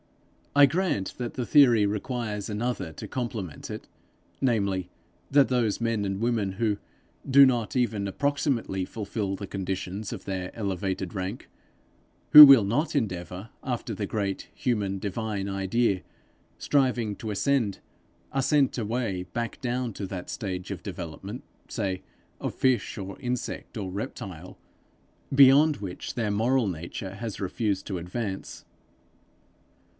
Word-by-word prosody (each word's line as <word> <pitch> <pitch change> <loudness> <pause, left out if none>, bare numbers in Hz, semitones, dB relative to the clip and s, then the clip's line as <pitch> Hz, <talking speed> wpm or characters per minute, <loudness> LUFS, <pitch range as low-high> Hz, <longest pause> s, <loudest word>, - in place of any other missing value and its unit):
I 145 0 +9
grant 160 - 0
that 120 -2 -4
the 125 - -2
theory 120 -7 +6
requires 105 0 -3
another 105 -5 -2
to - - -8
complement 110 - -5
it; - - -7 0.5
namely, 100 -8 +1 0.4
that 140 -1 +5
those 120 -5 +1
men 115 -3 0
and 95 -1 -2
women, 110 -4 0
who 105 0 0 0.5
do 140 +1 +9
not 120 -3 0
even 110 -5 +1
approximately 140 -5 0
fulfil 100 0 -3
the 100 +1 -7
conditions 95 +1 -4
of - - -7
their 95 -2 -4
elevated 95 -3 -2
rank, 95 +4 -5 0.8
who 150 0 +14
will 135 -7 +8
not 145 +11 0
endeavour 95 - -3
after 120 -3 -3
the 100 0 -3
great 100 -3 -3
human 105 -6 -1
divine 100 0 -3
idea, 95 +1 +1 0.6
striving 125 -7 +1
to 110 - -5
ascend, 115 -2 +1 0.5
are 135 - +1
sent 140 -1 +2
away 110 -4 -2
back 115 -1 -3
down 125 -2 -2
to 100 0 -5
that 90 -1 -6
stage 95 -2 -4
of 90 -4 -6
development, 95 - -7 0.3
say 95 -5 -2 0.4
of - - -3
fish 130 -5 +1
or 100 -1 -6
insect 125 -1 -4
or 100 -3 -3
reptile, 90 -3 -6 0.8
beyond 140 +2 +7
which 95 -3 -6
their 110 -4 0
moral 115 +3 +2
nature 90 +2 -5
has 110 0 -5
refused 100 0 -1
to 95 -3 -3
advance. 95 +3 -5
105 Hz, 135 wpm, -27 LUFS, 95-125 Hz, 0.8 s, who